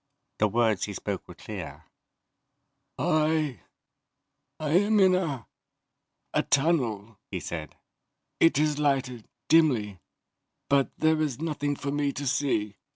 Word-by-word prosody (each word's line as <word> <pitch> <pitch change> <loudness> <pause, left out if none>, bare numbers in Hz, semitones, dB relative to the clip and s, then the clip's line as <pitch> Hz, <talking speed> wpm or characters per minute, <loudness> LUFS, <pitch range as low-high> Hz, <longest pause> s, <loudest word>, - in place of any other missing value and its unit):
The 110 - +4
words 110 -2 +1
he 105 - -6
spoke - - -4
were - - -11
clear. - - -8 1.1
"I 155 -3 +1 1.0
am 190 +8 +3
in 190 -1 +6
a... 150 - -1 0.9
a... - - +3
tunnel," 115 -9 0
he - - -3
said. 80 -2 -6 0.6
"It 165 -4 +5
is 150 0 +1
lighted, 135 -5 0 0.2
dimly, 120 - +3 0.7
but 140 -1 +3
there 155 0 +2
is 145 -6 -1
nothing 145 -3 -2
for 140 0 -4
me 145 -1 0
to 140 - -5
see." 125 -7 0
145 Hz, 120 wpm, -27 LUFS, 115-155 Hz, 1.1 s, in